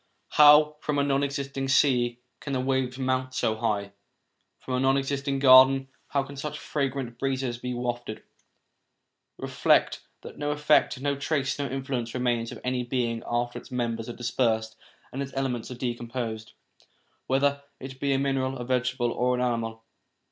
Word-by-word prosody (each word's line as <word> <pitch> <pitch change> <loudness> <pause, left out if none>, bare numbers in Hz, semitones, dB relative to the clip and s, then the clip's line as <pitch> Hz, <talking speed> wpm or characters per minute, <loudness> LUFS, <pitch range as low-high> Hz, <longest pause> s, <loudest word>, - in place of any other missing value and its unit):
How, 150 0 +6
from 150 -1 -2
a 140 - +3
non 140 -1 +1
existing 140 -1 -3
sea, 125 -3 +3 0.2
can 140 - -5
the 130 - 0
waves 130 -1 -1
mount 130 0 -1
so 110 - +1
high? 105 -3 -1 0.7
From 130 - -6
a 125 - +1
non 135 +1 +3
existing 140 0 -1
garden, 135 0 +7 0.2
how 140 -1 0
can 140 +1 -10
such 150 +2 -5
fragrant 135 -6 -3
breezes 130 -3 -2
be 125 0 -4
wafted? 120 -2 -4 1.1
Reflect - - +2 0.2
that - - -10
no 145 0 -1
effect, 150 -2 +2
no 140 +1 0
trace, 140 -1 -1
no 140 - -1
influence 130 -3 -3
remains 120 -2 0
of - - -8
any 125 0 -1
being 120 -2 -1
after 120 0 -1
its - - -16
members 115 -2 -2
are - - -4
dispersed 115 -2 -1 0.4
and 135 - -3
its 135 -1 -5
elements 130 -4 -2
v 125 - -6
are - - -15
decomposed, 120 -2 -4 0.7
whether 140 +1 +1 0.2
it 130 0 -9
be 140 0 0
a 135 - +3
mineral, 135 -1 -1
a 120 - -5
vegetable, 125 -1 0
or 125 +1 +1
an 125 - -2
animal. 115 -2 -2
130 Hz, 170 wpm, -27 LUFS, 120-135 Hz, 1.1 s, garden